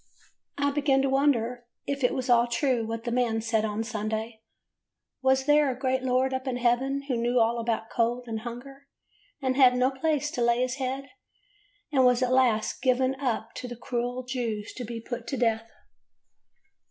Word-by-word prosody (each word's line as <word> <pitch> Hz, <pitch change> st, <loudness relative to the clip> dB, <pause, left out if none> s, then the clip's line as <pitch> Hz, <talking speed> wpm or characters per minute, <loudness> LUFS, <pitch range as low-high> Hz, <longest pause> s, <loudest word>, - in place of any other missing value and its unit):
I 285 Hz, 0 st, +1 dB
began 275 Hz, -2 st, +2 dB
to 275 Hz, -, +1 dB
wonder 250 Hz, -3 st, +1 dB, 0.2 s
if 280 Hz, -1 st, -3 dB
it 250 Hz, -, +2 dB
was 260 Hz, -1 st, -3 dB
all 240 Hz, -1 st, +4 dB
true 240 Hz, -1 st, 0 dB
what 225 Hz, 0 st, -4 dB
the 240 Hz, -, -3 dB
man 235 Hz, -2 st, +1 dB
said 225 Hz, -1 st, 0 dB
on 215 Hz, 0 st, -2 dB
Sunday. 220 Hz, 0 st, -4 dB, 0.8 s
Was 265 Hz, 0 st, +2 dB
there 295 Hz, 0 st, +4 dB
a 250 Hz, -, -3 dB
great 260 Hz, 0 st, 0 dB
Lord 260 Hz, +1 st, +1 dB
up 260 Hz, +1 st, -3 dB
in 250 Hz, -1 st, -1 dB
heaven 255 Hz, +3 st, +1 dB
who 260 Hz, -, 0 dB
knew 240 Hz, +1 st, +1 dB
all 230 Hz, +1 st, +2 dB
about 225 Hz, -1 st, -2 dB
cold, 240 Hz, +1 st, 0 dB
and 225 Hz, -1 st, -3 dB
hunger, 260 Hz, +5 st, -9 dB, 0.6 s
and 260 Hz, -1 st, +1 dB
had 255 Hz, -2 st, +6 dB
no 250 Hz, +1 st, +2 dB
place 295 Hz, +1 st, -1 dB
to 255 Hz, -, -3 dB
lay 235 Hz, +1 st, +3 dB
his 255 Hz, +1 st, -1 dB
head, 270 Hz, +1 st, -4 dB, 0.8 s
and 265 Hz, -3 st, +4 dB
was 250 Hz, 0 st, +4 dB
at 255 Hz, 0 st, +1 dB
last 245 Hz, -5 st, +2 dB
given 260 Hz, 0 st, +2 dB
up 235 Hz, -4 st, -2 dB
to 250 Hz, -, -5 dB
the 240 Hz, -, -7 dB
cruel 245 Hz, +1 st, -3 dB
Jews 235 Hz, -5 st, -3 dB
to 250 Hz, -, -4 dB
be 235 Hz, 0 st, -5 dB
put 235 Hz, 0 st, -6 dB
to 270 Hz, -, -3 dB
death? 225 Hz, -1 st, 0 dB
250 Hz, 190 wpm, -27 LUFS, 235-265 Hz, 0.8 s, had